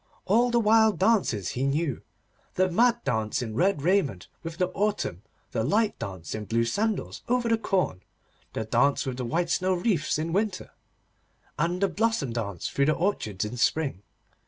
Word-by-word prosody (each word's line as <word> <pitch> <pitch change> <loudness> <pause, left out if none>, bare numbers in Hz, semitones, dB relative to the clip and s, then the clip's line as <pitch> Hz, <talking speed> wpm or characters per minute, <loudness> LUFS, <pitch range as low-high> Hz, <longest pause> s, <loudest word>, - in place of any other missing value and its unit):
All 235 +5 +3
the 240 0 +3
wild 220 -2 +4
dances 185 - +2
he 125 - -4
knew, 140 0 0 0.5
the 185 0 +2
mad 235 +5 +3
dance 110 +1 -1
in 110 -2 -5
red 175 - +1
raiment 160 - +1
with 165 0 -7
the 180 0 +1
autumn, 200 - -1 0.3
the 110 - -1
light 210 - +1
dance 95 -5 -6
in 110 -1 -4
blue 115 +3 +1
sandals 210 - -1
over 245 -1 +2
the 230 - +4
corn, 185 - 0 0.5
the 110 - -3
dance 125 +7 +2
with 130 -1 -4
white 165 +8 -1
snow 185 0 +2
wreaths 175 -5 0
in 160 +2 -2
winter, 200 -1 -1 0.9
and 175 +4 0
the - - +5
blossom 200 - 0
dance 100 -7 -3
through 140 - +1
the 155 - +4
orchards 110 - -1
in 115 +4 -6
spring. 135 - 0
165 Hz, 170 wpm, -27 LUFS, -, 0.9 s, the